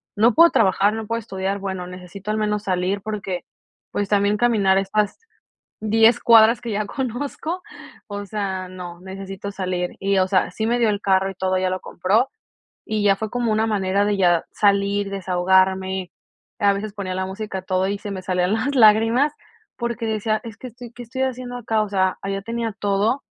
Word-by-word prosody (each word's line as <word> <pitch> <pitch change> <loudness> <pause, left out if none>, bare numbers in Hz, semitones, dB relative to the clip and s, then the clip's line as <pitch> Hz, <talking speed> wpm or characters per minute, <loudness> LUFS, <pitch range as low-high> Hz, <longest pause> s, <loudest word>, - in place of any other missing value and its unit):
no 225 +3 +4
puedo 335 +5 +7
trabajar, 200 -2 +3
no 220 0 -4
puedo 230 +2 -2
estudiar, 195 -2 -3
bueno, 190 -2 -4
necesito 180 +3 -7
al 215 - -1
menos 210 -1 -1
salir 185 +1 -1
porque, 195 -4 -4 0.5
pues, 205 -1 -2
también 205 0 +2
caminar 205 -5 +3
estas 205 +1 -1 0.6
10 225 +2 +4
cuadras 230 0 +6
que 230 -3 -5
ya 210 +1 -1
conozco, 285 - -4 0.4
o 205 -1 -6
sea, 190 -3 -3
no, 180 -1 -9
necesito 195 +1 -7
salir. 185 -2 -3
Y, 195 0 +1
o 185 0 +2
sea, 185 -2 +2
sí 220 +4 -3
me 240 +2 +1
dio 235 -2 +3
el 205 -1 -2
carro 195 -1 +2
y 195 - -9
todo, 185 0 -1
ya 185 0 +1
lo 185 0 -2
compró, 210 +9 +1 0.6
y 215 -1 -2
ya 200 -1 +5
fue 215 +1 -4
como 240 -2 0
una 220 +1 +2
manera 200 -1 +1
de 205 0 +1
ya 175 -3 +3
salir, 200 0 +2
desahogarme. 190 0 +1 0.5
A 205 -3 +4
veces 205 +1 -4
ponía 195 -3 -4
la 190 0 -2
música 195 +1 -5
a 185 - -7
todo, 185 0 0
y 200 0 -2
se 205 - -7
me 190 -1 -5
salían 180 0 0
las 260 +6 -1
lágrimas, 225 +5 +5 0.4
porque 235 -1 -3
decía: 215 0 0
"Es 225 -3 -9
que 255 - -9
estoy 240 0 -11
¿qué 245 - -9
estoy 250 +3 -4
haciendo 255 -1 -3
acá?", 225 -2 0
o 210 - -3
sea, 190 -2 +1
allá 195 0 -3
tenía 230 0 -3
todo, 205 +6 +1
200 Hz, 195 wpm, -22 LUFS, 190-225 Hz, 0.6 s, puedo